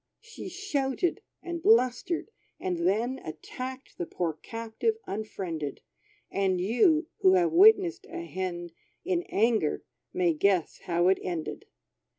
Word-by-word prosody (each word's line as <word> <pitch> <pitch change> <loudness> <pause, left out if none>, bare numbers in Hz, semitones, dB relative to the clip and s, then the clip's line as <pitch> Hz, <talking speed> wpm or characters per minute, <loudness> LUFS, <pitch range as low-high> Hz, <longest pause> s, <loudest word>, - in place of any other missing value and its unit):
She 445 -4 -9
shouted, 350 -4 -1 0.2
and 345 -1 -4
blustered; 340 - +2 0.3
and 175 -2 -1
then 235 +7 +1
Attacked 255 - -7
the 175 - -2
poor 170 -1 -2
captive 230 - -3
unfriended; 180 -8 -4 0.5
And 190 -2 +1
you, 305 - +3
(who 375 -1 +6
have 350 -2 +3
witnessed 380 0 +5
a 345 0 -6
hen 175 - -4 0.3
In 360 -2 +1
anger,) 220 -7 +2 0.3
may 175 -2 +2
guess 185 +1 +1
how 175 0 +2
it 190 - +3
ended. 170 -4 -4
230 Hz, 125 wpm, -28 LUFS, -, 0.5 s, who